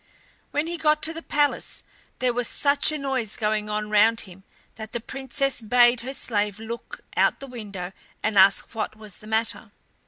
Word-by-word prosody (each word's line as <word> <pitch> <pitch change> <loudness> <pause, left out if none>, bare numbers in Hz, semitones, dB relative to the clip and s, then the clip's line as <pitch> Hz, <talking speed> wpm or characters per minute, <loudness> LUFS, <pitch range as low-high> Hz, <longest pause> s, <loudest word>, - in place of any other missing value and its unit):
When 295 +2 0
he 340 0 -4
got 305 -1 +2
to 320 - +3
the 330 - -6
palace 290 -2 0 0.3
there 250 -1 +1
was 245 0 0
such 285 +1 +3
a 305 - -2
noise 265 -6 -2
going 210 -1 0
on 210 0 -2
round 220 +2 +5
him 190 -1 -12 0.3
that 220 -1 -9
the 235 - -1
Princess 270 +2 -2
bade 240 +2 +4
her 260 +3 -5
slave 210 -4 -1
look 235 - -7
out - - +3
the 275 - -7
window 205 -8 -7 0.3
and 220 -1 0
ask 195 +3 +5
what 220 -1 -3
was 215 -3 -10
the 215 - -13
matter. 220 +1 -1
230 Hz, 185 wpm, -25 LUFS, 210-275 Hz, 0.3 s, round